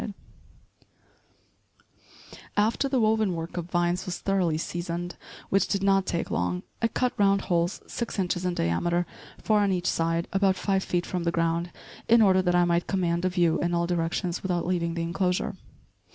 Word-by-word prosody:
After 225 Hz, +6 st, +2 dB
the 265 Hz, -2 st, +1 dB
woven 215 Hz, -4 st, +2 dB
work 165 Hz, +1 st, -5 dB
of 175 Hz, -1 st, -4 dB
vines 175 Hz, +1 st, 0 dB
was 180 Hz, -, -3 dB
thoroughly 185 Hz, -5 st, 0 dB
seasoned, 175 Hz, +1 st, -4 dB, 0.3 s
which 195 Hz, 0 st, +2 dB
did 200 Hz, -1 st, -1 dB
not 195 Hz, -1 st, +3 dB
take 170 Hz, -, -2 dB
long, 90 Hz, 0 st, -1 dB, 0.2 s
I 230 Hz, -, +3 dB
cut 250 Hz, +2 st, -1 dB
round 200 Hz, -1 st, +4 dB
holes 175 Hz, +1 st, -1 dB
six 235 Hz, -2 st, -4 dB
inches 180 Hz, -2 st, -1 dB
in 180 Hz, -1 st, -1 dB
diameter, 175 Hz, -, 0 dB, 0.3 s
four 215 Hz, -1 st, +2 dB
on 200 Hz, -1 st, +2 dB
each 180 Hz, -1 st, -1 dB
side, 165 Hz, 0 st, 0 dB
about 195 Hz, -1 st, +3 dB
five 195 Hz, 0 st, 0 dB
feet 175 Hz, -1 st, -1 dB
from 180 Hz, -2 st, -3 dB
the 170 Hz, -, +1 dB
ground, 170 Hz, +1 st, 0 dB, 0.4 s
in 230 Hz, +1 st, +6 dB
order 190 Hz, -2 st, +5 dB
that 180 Hz, -1 st, +1 dB
I 175 Hz, 0 st, +4 dB
might 170 Hz, 0 st, +1 dB
command 175 Hz, -2 st, 0 dB
a -, -, +3 dB
view 175 Hz, -3 st, +2 dB
in 175 Hz, 0 st, 0 dB
all 170 Hz, 0 st, +1 dB
directions 170 Hz, +1 st, -1 dB
without 180 Hz, -2 st, -1 dB
leaving 170 Hz, -2 st, -1 dB
the 170 Hz, -, -2 dB
enclosure. 180 Hz, +1 st, -1 dB
175 Hz, 175 wpm, -27 LUFS, 170-195 Hz, 0.4 s, in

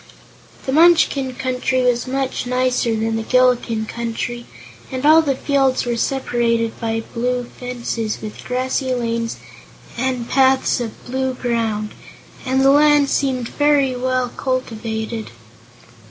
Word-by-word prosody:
The 265 Hz, -, -1 dB
Munchkin 290 Hz, -4 st, +4 dB
Country 255 Hz, 0 st, -1 dB
was 245 Hz, 0 st, +1 dB
much 265 Hz, -1 st, -2 dB
nicer 250 Hz, -2 st, +1 dB
than 225 Hz, 0 st, -1 dB
the -, -, -2 dB
Gillikin 240 Hz, -2 st, +2 dB
Country, 235 Hz, +1 st, -4 dB, 0.4 s
and 260 Hz, +1 st, -3 dB
all 315 Hz, +2 st, +7 dB
the 280 Hz, -4 st, 0 dB
fields 270 Hz, -2 st, +1 dB
were 240 Hz, -1 st, -1 dB
separated 235 Hz, -3 st, 0 dB
by 225 Hz, 0 st, -2 dB
blue 245 Hz, +1 st, -1 dB
fences, 235 Hz, -3 st, -4 dB
with 215 Hz, -1 st, -8 dB
grassy 255 Hz, +1 st, -1 dB
lanes 230 Hz, -1 st, -2 dB, 0.6 s
and 250 Hz, -2 st, -1 dB
paths 265 Hz, -1 st, +3 dB
of 230 Hz, -3 st, -6 dB
blue 260 Hz, +1 st, -2 dB
ground, 225 Hz, -4 st, -2 dB, 0.6 s
and 260 Hz, +1 st, +2 dB
the 270 Hz, 0 st, +6 dB
land 295 Hz, -1 st, +4 dB
seemed 255 Hz, -4 st, 0 dB
well 260 Hz, -3 st, +2 dB
cultivated. 225 Hz, -4 st, -3 dB
250 Hz, 125 wpm, -20 LUFS, 230-265 Hz, 0.6 s, all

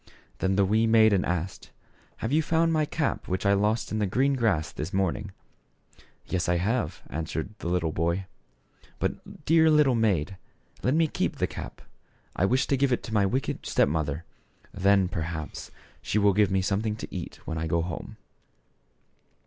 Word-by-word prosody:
Then 95 Hz, 0 st, +1 dB
the 100 Hz, 0 st, +4 dB
wee 110 Hz, +3 st, +2 dB
maiden 110 Hz, -4 st, +5 dB
asked, 90 Hz, +1 st, -3 dB, 0.2 s
" -, -, -33 dB
Have 115 Hz, -, -2 dB
you 155 Hz, +2 st, +4 dB
found 165 Hz, +1 st, +2 dB
my 155 Hz, -1 st, +2 dB
cap 150 Hz, -1 st, -2 dB
which 95 Hz, +1 st, -2 dB
I 100 Hz, -, +5 dB
lost 105 Hz, +3 st, +1 dB
in 110 Hz, -, -1 dB
the 105 Hz, -, +1 dB
green 135 Hz, +8 st, +2 dB
grass 110 Hz, -, +1 dB
this 75 Hz, -, -5 dB
morning? 95 Hz, +1 st, -1 dB, 0.3 s
" -, -, -42 dB
" -, -, -25 dB, 0.2 s
Yes, 90 Hz, -1 st, -1 dB
I 90 Hz, -, +3 dB
have," 100 Hz, -2 st, -1 dB
answered 80 Hz, +2 st, -3 dB
the -, -, -5 dB
little 85 Hz, -2 st, 0 dB
boy, 85 Hz, +4 st, -1 dB, 0.7 s
"but, -, -, -5 dB
dear 160 Hz, 0 st, +5 dB
little 150 Hz, -4 st, +5 dB
maid, 100 Hz, -6 st, +1 dB, 0.4 s
let 130 Hz, +4 st, +1 dB
me 165 Hz, 0 st, +4 dB
keep -, -, -2 dB
the -, -, 0 dB
cap. -, -, -8 dB, 0.5 s
I 95 Hz, -, +2 dB
wish 130 Hz, +6 st, +2 dB
to 140 Hz, -, +1 dB
give 135 Hz, 0 st, +2 dB
it 125 Hz, -, 0 dB
to 110 Hz, -, -7 dB
my 100 Hz, -2 st, +3 dB
wicked 130 Hz, +6 st, -2 dB
step -, -, +2 dB
mother; 80 Hz, 0 st, -2 dB, 0.5 s
then, 95 Hz, 0 st, +3 dB
perhaps, 80 Hz, -2 st, -5 dB, 0.3 s
she -, -, -1 dB
will 100 Hz, -1 st, +4 dB
give 105 Hz, 0 st, +3 dB
me 95 Hz, -1 st, +1 dB
something 105 Hz, +2 st, 0 dB
to -, -, -8 dB
eat -, -, -5 dB
when 80 Hz, -, -3 dB
I 80 Hz, -, -2 dB
go 85 Hz, +1 st, +1 dB
home." 85 Hz, -2 st, -6 dB
100 Hz, 190 wpm, -27 LUFS, 85-115 Hz, 0.7 s, maiden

